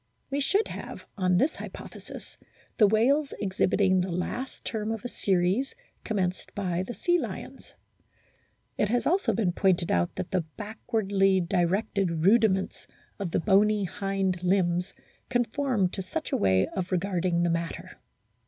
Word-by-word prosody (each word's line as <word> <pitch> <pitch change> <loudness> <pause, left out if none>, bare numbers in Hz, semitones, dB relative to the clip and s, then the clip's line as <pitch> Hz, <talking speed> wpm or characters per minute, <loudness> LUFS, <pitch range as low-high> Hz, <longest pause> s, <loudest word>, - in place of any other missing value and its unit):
We 280 - 0
should 395 +10 +2
have - - -8
on 185 -3 +2
this 280 - +2
hypothesis - - -10 0.4
the 210 - +7
whales 265 +8 +2
exhibiting 190 -1 +2
the 185 - -2
last 240 +9 -4
term 220 -1 -2
of 225 0 -5
a - - 0
series 195 +4 0 0.3
commenced 185 -4 -2
by 180 -3 -1
the 240 +6 -5
sea 350 0 +2
lions. 255 - -7 1.0
It 210 - +2
has 245 +2 +1
been - - +2
also 305 - +1 0.2
pointed 185 -3 +2
out 85 0 +1
that 180 - -5
the 185 - +2 0.2
backwardly 205 -3 +1
directed 180 -1 0
rudiments 200 -2 +3 0.3
of 195 -3 -2
the - - 0
bony 205 +2 +3
hind 195 -1 -1
limbs 180 -1 +1 0.4
conform 245 -3 +1
to 190 - -5
such 185 - -5
a - - +2
way 95 -1 +3
of 185 -2 -4
regarding 180 -2 0
the 170 - +2
matter. 170 0 -4
195 Hz, 145 wpm, -27 LUFS, 180-225 Hz, 1.0 s, the